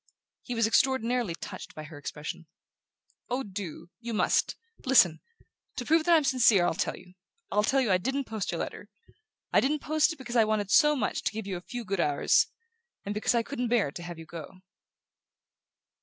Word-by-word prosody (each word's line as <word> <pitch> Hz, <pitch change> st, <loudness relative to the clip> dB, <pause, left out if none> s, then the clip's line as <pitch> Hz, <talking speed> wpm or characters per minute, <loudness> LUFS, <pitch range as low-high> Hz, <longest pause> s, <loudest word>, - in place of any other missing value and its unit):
He 245 Hz, -, -5 dB
was 230 Hz, -1 st, +3 dB
extraordinarily 240 Hz, -4 st, +1 dB
touched -, -, -9 dB
by 155 Hz, -, -7 dB
her 155 Hz, 0 st, -11 dB
expression. 150 Hz, +2 st, -7 dB, 0.8 s
"Oh, 255 Hz, +2 st, -1 dB
do! 185 Hz, -, -7 dB
You 235 Hz, -1 st, -5 dB
must. -, -, +2 dB, 0.3 s
Listen: 185 Hz, -12 st, +5 dB, 0.5 s
to 245 Hz, -, -4 dB
prove 320 Hz, +2 st, +3 dB
that 345 Hz, -1 st, +6 dB
I'm 315 Hz, -, +4 dB
sincere 240 Hz, -9 st, +4 dB
I'll -, -, +1 dB
tell -, -, -2 dB
you...I'll 185 Hz, -, -5 dB
tell 270 Hz, +6 st, +2 dB
you 235 Hz, -6 st, +1 dB
I 185 Hz, -, +4 dB
didn't 270 Hz, +8 st, -1 dB
post 220 Hz, -5 st, -4 dB
your -, -, -2 dB
letter...I 435 Hz, -1 st, -5 dB
didn't 295 Hz, +2 st, 0 dB
post 310 Hz, +2 st, +2 dB
it 320 Hz, -, -7 dB
because 250 Hz, -3 st, -7 dB
I 230 Hz, -, +6 dB
wanted 215 Hz, -2 st, -1 dB
so 300 Hz, -2 st, +6 dB
much 270 Hz, -, -1 dB
to -, -, -1 dB
give 220 Hz, -1 st, -5 dB
you 195 Hz, -2 st, -3 dB
a 175 Hz, -, -6 dB
few 240 Hz, +5 st, -7 dB
good 195 Hz, -1 st, -2 dB
hours... 145 Hz, -4 st, +3 dB, 0.6 s
and 200 Hz, -, -2 dB
because 210 Hz, +3 st, +1 dB
I 235 Hz, -, +2 dB
couldn't 250 Hz, -1 st, -3 dB
bear 225 Hz, -11 st, +2 dB
to 175 Hz, -, -8 dB
have 175 Hz, -1 st, -7 dB
you 165 Hz, -, -10 dB
go." 170 Hz, +3 st, -10 dB
220 Hz, 190 wpm, -28 LUFS, 180-265 Hz, 0.8 s, that